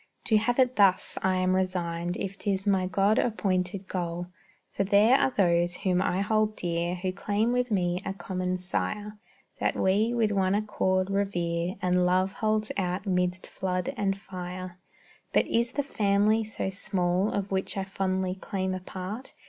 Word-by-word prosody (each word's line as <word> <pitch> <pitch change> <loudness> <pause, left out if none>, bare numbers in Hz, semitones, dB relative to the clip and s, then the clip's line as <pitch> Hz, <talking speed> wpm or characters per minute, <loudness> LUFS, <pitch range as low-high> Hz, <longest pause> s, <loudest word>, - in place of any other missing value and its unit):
To 220 - +3
have 240 +3 +1
it 255 -1 +3
thus, 195 -3 +3
I 190 -1 +2
am 185 0 +2
resigned, 175 -2 -1
If 195 0 -4
'tis 195 -1 -2
my 190 -2 +2
God 200 +3 +2
appointed 190 -4 -1
goal; 175 -1 -3 0.5
For 195 - 0
there 205 +5 +5
are 270 - +3
those 175 -6 +2
whom 180 -1 +1
I 185 0 0
hold 215 +1 +1
dear, 170 0 -1
Who 185 +1 -2
claim 210 +4 0
with 250 0 +1
me 180 -4 +1
a 195 - -3
common 185 -1 -3
sire, 210 +3 -3 0.4
That - - +1
we, 205 +5 +2
with 230 -3 +1
one 190 -1 +2
accord, 190 -3 0
revere, 175 -3 -1
And 180 0 +3
love 185 +2 +2
holds 215 0 0
out 185 +1 -1
midst 180 -1 0
flood 180 -1 -2
and 195 -2 0
fire. 185 -1 -7 0.5
But - - +4
is 235 +2 0
the 285 - 0
family 210 -2 +2
so 205 -2 -3
small 185 0 0
Of 200 -1 -3
which 190 +1 -1
I 195 - 0
fondly 190 -1 -1
claim 190 0 -3
a 185 - -3
part? 190 +7 -7
190 Hz, 170 wpm, -28 LUFS, 180-205 Hz, 0.5 s, there